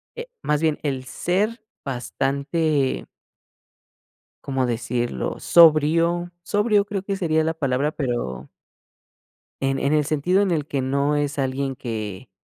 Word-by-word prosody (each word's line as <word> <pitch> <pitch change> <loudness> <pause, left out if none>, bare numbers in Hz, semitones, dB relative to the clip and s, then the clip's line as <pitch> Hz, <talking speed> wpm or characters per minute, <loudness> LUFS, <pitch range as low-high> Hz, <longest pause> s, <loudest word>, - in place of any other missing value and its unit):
eh, 475 +1 -6 0.2
más 150 +1 +1
bien, 155 -2 +2
el 135 -3 -2
ser 210 - -1 0.2
bastante 140 +3 -1 1.4
¿Cómo 135 -2 0
decirlo? 120 - -2
Sobrio. 170 +2 +4
Sobrio 205 +1 +2
creo 200 -2 -4
que 195 0 -2
sería 160 -4 +1
la 160 +1 0
palabra, 140 -1 0
pero 120 - -3 1.1
en 135 0 +1
en 140 - +1
el 150 -1 +3
sentido 155 +6 +2
en 200 -2 +1
el 155 -4 0
que 140 - -2
no 140 +3 +1
es 145 0 -1
alguien 135 0 -1
que, 110 -2 -5
145 Hz, 130 wpm, -23 LUFS, 130-170 Hz, 1.4 s, Sobrio